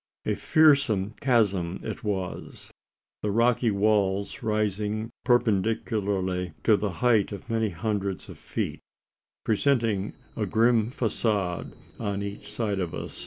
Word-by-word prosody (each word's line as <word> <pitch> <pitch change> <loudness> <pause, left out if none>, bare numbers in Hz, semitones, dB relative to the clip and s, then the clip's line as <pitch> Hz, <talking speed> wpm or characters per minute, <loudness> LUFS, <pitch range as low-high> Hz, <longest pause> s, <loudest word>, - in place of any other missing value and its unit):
A - - +1
fearful 140 -10 +3
chasm 100 -9 +2
it 110 - -5
was 95 -4 -4 0.5
the 105 - -1
rocky 115 +2 +3
walls 100 -1 +1
rising 105 +1 -1
perpendicularly 100 - +1
to 110 - +5
the 105 0 -1 0.2
height 110 -5 +4
of 100 +3 -7
many 110 -1 +1
hundreds 100 +1 -3
of - - -11
feet - - -3 0.7
presenting 110 -4 +1 0.2
a - - -1
grim 115 0 +3
facade 105 -7 -1 0.3
on 100 -2 -2
each 100 0 -7
side 105 -2 -1
of 90 -3 -3
us. - - -6
105 Hz, 120 wpm, -27 LUFS, 100-115 Hz, 0.7 s, to